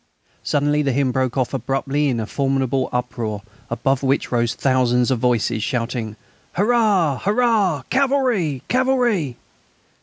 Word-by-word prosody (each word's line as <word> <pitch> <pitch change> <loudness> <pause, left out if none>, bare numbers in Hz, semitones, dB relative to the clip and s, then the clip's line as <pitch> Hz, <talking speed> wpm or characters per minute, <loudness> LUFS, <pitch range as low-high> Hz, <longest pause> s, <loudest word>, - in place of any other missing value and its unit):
Suddenly 145 +1 +1
the 140 -3 0
hymn 135 0 +1
broke 130 0 -1
off 130 0 0
abruptly 135 +3 -1
in 120 -3 -1
a 110 - -2
formidable 135 0 -1
uproar, 115 -4 -3 0.3
above 125 +3 0
which 135 0 0
rose 120 -1 0
thousands 125 -1 +2
of 125 - +1
voices 120 -2 +1
shouting: 115 -2 -3 0.4
"Hurrah! 205 - +2
Hurrah! 205 - +1
Cavalry! 255 - +1
Cavalry!" 245 - +1
135 Hz, 125 wpm, -21 LUFS, 125-185 Hz, 0.4 s, thousands